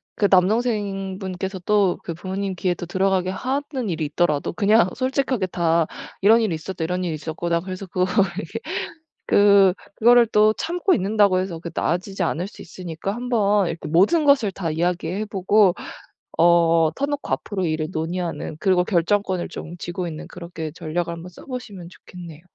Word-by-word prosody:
그 205 - +2
남동생분께서 195 -2 0
또 205 -4 +3
그 170 - -4
부모님 190 +2 -4
귀에 180 0 0
또 175 - -7
들어가게 190 0 +1
하는 260 +3 -3
일이 160 -3 -2
있더라도 150 0 0
그냥 205 +1 +4
솔직하게 255 -5 0
다 170 -2 +1 0.4
"이런 220 +4 +6
일이 215 -6 0
있었다, 165 +2 -5
이런 180 +2 -2
일이 170 -3 -2
있었고, 160 +2 -4
난 170 0 +1
그래서 185 +1 -6
그거를 185 0 -1 0.2
이렇게" 225 +7 -5 0.7
그 200 -2 +5 0.2
그거를 240 +1 +6
또 215 -1 +4
참고 355 - 0
있는다고 200 -1 +2
해서 185 -3 -4
그게 170 0 -8
나아지지 185 +3 -1
않을 175 +1 -1
수 200 - -12
있으니까 180 +2 -6
한번 210 -5 +1
이렇게 165 -2 -5
모든 195 - +3
것을 270 -8 +4
다 180 -4 -3
이야기해 175 +4 -1
보고, 195 -1 +3 0.6
어, 165 -1 +4
터놓고 285 +1 -3
앞으로 195 -3 -2
일을 155 -1 -1
논의하는, 170 -1 -3
그리고 185 -3 +3
결정권을 185 0 0
좀 170 +2 -8
쥐고 175 +1 -4
있는 155 -2 -7
그렇게 170 -3 -7
전략을 170 +2 -3
한번 170 +2 -9
써 175 - -14
보시면 210 -9 -7
좋겠네요. 175 -3 -12
185 Hz, 375 characters per minute, -22 LUFS, 170-205 Hz, 0.7 s, 이런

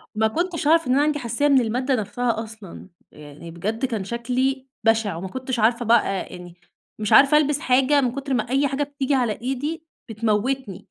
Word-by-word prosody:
ما 220 +1 +2
كنتش 335 +5 -2
أعرف 330 0 +4
إن 250 - +2
أنا 275 - +3
عندي 300 0 0
حساسية 240 +3 0
من 275 -3 +5
المادة 250 +4 0
نفسها 225 +1 -2
أصلًا. 215 -4 -12 0.2
يعني 150 +2 -12
بجد 215 +9 -3
كان 225 -6 -3
شكلي 255 +5 -2 0.2
بشع، 225 -4 +2
وما 175 +3 -5
كنتش 260 +3 -4
عارفة 235 +2 +2
بقى، 230 +1 +5 0.2
آآ، - - -10
يعني 175 -1 -11 0.4
مش 210 -1 0
عارفة 280 +2 +7
ألبس 295 -1 +1
حاجة 270 +1 +3
من 245 -2 0
كتر 275 0 -3
ما 240 -2 -1
أي 275 +3 +2
حاجة 275 +2 -1
بتيجي 285 -1 -2
على 245 -4 +1
إيدي 285 +6 -3 0.3
بتموتني 220 0 -2
250 Hz, 195 wpm, -22 LUFS, 220-275 Hz, 0.4 s, عارفة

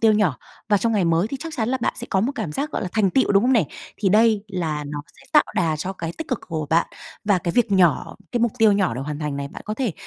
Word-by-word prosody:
tiêu 220 -1 +5
nhỏ, 200 -10 +2 0.3
và 205 - +4
trong 230 +3 0
ngày 200 -4 +2
mới 165 +3 +2
thì 275 - -4
chắc 325 +1 -6
chắn 225 -1 0
là 260 - 0
bạn - - +1
sẽ - - -6
có 190 - +2
một 255 +7 0
cảm 160 - -4
giác 295 - -2
gọi - - -3
là 185 - -3
thành 210 -4 +2
tựu, 260 -2 +2
đúng 195 +2 +5
hông 255 - +3
nè? 225 -8 +4 0.3
Thì 200 - +1
đây 215 0 +4
là 160 -6 -2
nó 145 0 -5 0.2
sẽ 270 - -18
tạo 300 - +6
đà 160 -3 +1
cho 180 +5 -4
cái 165 -3 -5
tích 320 - -5
cực 255 - -1
của 155 -2 -3
bạn. 165 +1 +3 0.4
Và 205 -3 +3
cái 170 -1 -2
việc 235 -2 +2
nhỏ, 175 -6 +3 0.2
cái 240 - 0
mục 235 -2 +2
tiêu 220 -2 +6
nhỏ 195 - +1
được 130 - -4
hoàn 150 0 -4
thành 150 -2 -3
này 140 0 -4
bạn - - -10
có 215 - -3
thể 240 -8 -1
200 Hz, 305 wpm, -22 LUFS, 165-230 Hz, 0.4 s, tạo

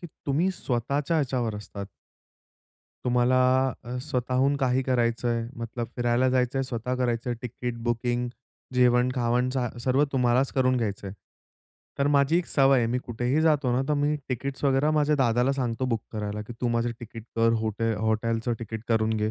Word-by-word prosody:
की 175 - -7 0.2
तुम्ही 155 +7 +2
स्वतःच्या 140 0 -1
ह्याच्यावर 125 -6 0
असतात. 100 -1 -7 1.2
तुम्हाला 125 0 +3 0.5
अ, 120 +1 -5
स्वतःहून 130 0 0
काही 130 -1 +1
करायचंय, 120 -2 0
मतलब 115 0 -5
फिरायला 120 +1 +2
जायचंय. 130 +1 +1
स्वतः 125 -1 -3
करायचंय 120 -1 -1
तिकीट 125 0 -5
बुकिंग, 120 +1 -1 0.5
जेवण-खावण 125 0 +2
झा 130 -2 -1
सर्व 130 +4 +2
तुम्हालाच 125 0 +2
करून 130 -1 +2
घ्यायचंय. 100 -4 -3 0.9
तर 140 - +2
माझी 140 +4 +4
एक 180 - -3
सवय 135 -1 +4
आहे. 115 - +2
मी 125 +2 0
कुठेही 125 +4 -1
जातो 150 -5 +3
ना 125 +2 +1
तर 150 - +2
मी 145 +1 +1
तिकीट्स 135 +2 -4
वगैरा 140 +2 +3
माझ्या 150 0 +3
दादाला 125 0 +2
सांगतो 125 -2 -2
बुक 115 -3 0
करायला, 105 -1 -3
की 115 +3 -9
तू 125 - +1
माझं 120 0 0
तिकीट 115 -1 -9
कर. 115 0 +4
हो 110 -1 0 0.4
हॉटेलचं 115 +1 0
तिकीट 110 -1 -6
करून 110 -1 +2
घे. 105 0 0
125 Hz, 160 wpm, -26 LUFS, 115-135 Hz, 1.2 s, माझी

